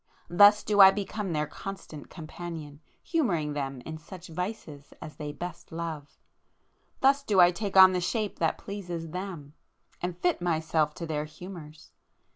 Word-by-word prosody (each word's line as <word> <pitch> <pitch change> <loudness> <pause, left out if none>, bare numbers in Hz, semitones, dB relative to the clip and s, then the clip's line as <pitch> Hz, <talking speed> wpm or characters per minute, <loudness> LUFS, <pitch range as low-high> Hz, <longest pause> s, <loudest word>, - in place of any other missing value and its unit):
—thus 205 +4 +7
do 205 -1 0
I 190 - +11
become 200 0 -3
their 150 -1 0
constant 175 -3 -9
companion, 160 -3 -8 0.2
humouring 175 - 0
them 135 -3 -4
in 160 +4 -7
such 180 +2 -11
vices 165 -5 -6
as 155 - -10
they 150 -1 -5
best 175 +3 -8
love!—thus 165 - -4
do 210 -8 +1
I 175 0 +8
take 195 +2 -3
on 190 0 +9
the 180 - 0
shape 210 +3 -2
that 165 -1 +1
pleases 175 -5 -6
them, 175 -6 -6 0.5
and 175 0 -3
fit 350 - 0
myself 160 -3 0
to 170 - -5
their 150 -2 -2
humours! 155 -1 -11
175 Hz, 150 wpm, -28 LUFS, 155-195 Hz, 0.5 s, I